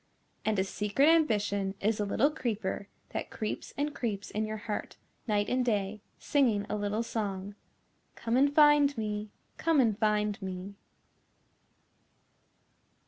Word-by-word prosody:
And 215 Hz, -1 st, +1 dB
a 190 Hz, -, +3 dB
secret 210 Hz, +9 st, +2 dB
ambition 205 Hz, -11 st, +2 dB
is 215 Hz, +1 st, +1 dB
a 205 Hz, -, +1 dB
little 260 Hz, +8 st, +2 dB
creeper 215 Hz, -8 st, -3 dB, 0.2 s
that -, -, -4 dB
creeps 215 Hz, -, -4 dB
and 290 Hz, +1 st, -1 dB
creeps 215 Hz, -7 st, -3 dB
in 215 Hz, +1 st, -1 dB
your 215 Hz, 0 st, -4 dB
heart 210 Hz, 0 st, -5 dB, 0.3 s
night 205 Hz, -2 st, +1 dB
and 255 Hz, 0 st, +1 dB
day, 210 Hz, -3 st, -1 dB, 0.2 s
singing 235 Hz, -8 st, +2 dB
a -, -, 0 dB
little 210 Hz, +2 st, -1 dB
song, 205 Hz, -3 st, -3 dB, 0.6 s
"Come 230 Hz, 0 st, -1 dB
and 280 Hz, +2 st, +4 dB
find 295 Hz, -2 st, +5 dB
me, 210 Hz, -1 st, -3 dB, 0.3 s
come 325 Hz, -2 st, +3 dB
and 225 Hz, -5 st, +3 dB
find 210 Hz, -1 st, +1 dB
me." 190 Hz, +1 st, -5 dB
215 Hz, 140 wpm, -30 LUFS, 205-250 Hz, 0.6 s, find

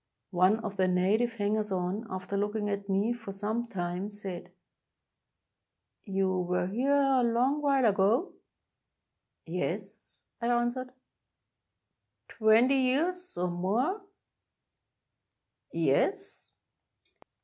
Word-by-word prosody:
One 185 Hz, +3 st, +4 dB
of 210 Hz, -3 st, -5 dB
the 185 Hz, -1 st, +3 dB
native 200 Hz, +6 st, +2 dB
hangers 210 Hz, -1 st, -1 dB
on, 190 Hz, +4 st, -2 dB
after 185 Hz, +1 st, -5 dB
looking 205 Hz, +1 st, -1 dB
at 200 Hz, 0 st, -4 dB
me 200 Hz, +5 st, +1 dB
for 225 Hz, -4 st, -8 dB
some 215 Hz, +4 st, -3 dB
time, 180 Hz, -1 st, -3 dB
said: 190 Hz, -4 st, -7 dB, 0.8 s
— -, -, -57 dB
"You 190 Hz, -2 st, 0 dB
were 180 Hz, 0 st, 0 dB
here 240 Hz, +9 st, 0 dB, 0.3 s
a -, -, +3 dB
long 245 Hz, +5 st, +2 dB
while 275 Hz, -3 st, +3 dB
ago?" 215 Hz, -, +2 dB, 1.1 s
"Yes," -, -, -5 dB, 0.2 s
I 235 Hz, -, -1 dB
answered. 240 Hz, +1 st, 0 dB, 1.4 s
"Twenty 230 Hz, +5 st, +4 dB
years, 330 Hz, -, 0 dB
or 180 Hz, 0 st, 0 dB
more?" 225 Hz, -, 0 dB, 1.7 s
"Yes." -, -, -1 dB
210 Hz, 105 wpm, -29 LUFS, 190-240 Hz, 1.7 s, One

